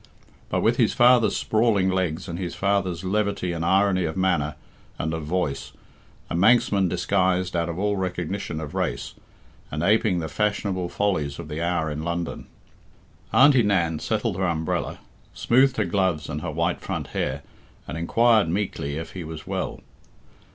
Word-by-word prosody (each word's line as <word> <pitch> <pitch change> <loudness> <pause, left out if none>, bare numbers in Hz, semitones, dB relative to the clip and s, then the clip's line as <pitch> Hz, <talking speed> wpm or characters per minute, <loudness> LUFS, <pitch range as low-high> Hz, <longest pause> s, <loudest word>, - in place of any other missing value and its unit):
But - - 0
with - - +3
his - - +2
father's 120 -3 +5
sprawling 110 -4 +2
legs 95 -1 -1
and 85 0 -5
his 90 -2 -4
father's 95 -3 0
levity 100 -2 -1
and 85 -1 -3
irony 95 0 +3
of 80 +2 -3
manner 85 -6 +1 0.4
and 80 +1 -2
of 80 - -3
voice 75 -5 -2 0.5
a - - -5
Manxman 100 0 +4
disguised 90 +1 +1
out 85 0 0
of 85 - -4
all 105 +1 0
recognition 90 -2 -3
of 75 -2 -6
race, - - -2 0.6
and 75 +1 -3
apeing 105 -1 +3
the 80 - -3
fashionable 100 0 -1
follies 75 -10 -1
of 85 -2 -8
the 75 +2 -4
hour 85 -2 0
in 75 +1 -4
London. 85 +1 -4 0.8
Auntie 135 -2 +6
Nan 90 -7 +1
settled 110 -1 -1
her 95 -1 +1
umbrella, 80 -2 -2 0.4
smoothed 130 +2 +3
her 105 - +1
gloves 90 -4 0
and - - -4
her - - -4
white - - -1
front - - -4
hair, 70 +2 -2 0.4
and 70 - -5
inquired 110 +4 +3
meekly 85 -6 -2
if 80 - -6
he 90 - -6
was 80 -1 -8
well. - - -4
90 Hz, 165 wpm, -24 LUFS, 80-100 Hz, 0.8 s, Auntie